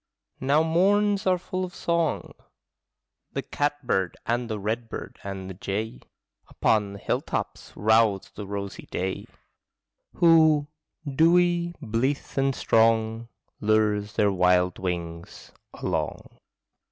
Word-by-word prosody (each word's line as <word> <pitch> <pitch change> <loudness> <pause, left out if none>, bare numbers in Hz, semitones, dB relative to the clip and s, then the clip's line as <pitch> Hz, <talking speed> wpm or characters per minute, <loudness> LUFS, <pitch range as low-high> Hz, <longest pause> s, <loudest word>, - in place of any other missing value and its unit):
Now 140 +4 +3
morns 200 +5 +2
are 185 -1 +4
full 185 +1 -4
of 180 -1 -6
song; 170 -2 -1 1.0
The - - -2
catbird 145 -10 -1
and 120 +1 -1
the 110 - -2
redbird 110 +3 -4
and 95 -1 -6
the 95 - -6
jay 100 - -4 0.5
Upon 105 -2 +1
the - - -8
hilltops - - -3
rouse 110 -2 +2
the 100 -1 -8
rosy 100 -1 -6
day, 95 +1 -3 0.9
Who, 160 -3 +5 0.4
dewy, 170 +4 +3
blithe, 130 +2 -2
and 135 -1 +1
strong, 115 0 +2 0.3
Lures 105 -1 +1
their 105 -1 +2
wild 90 -1 +2
wings 85 -2 -5 0.2
along. - - -4
115 Hz, 110 wpm, -26 LUFS, 100-160 Hz, 1.0 s, Who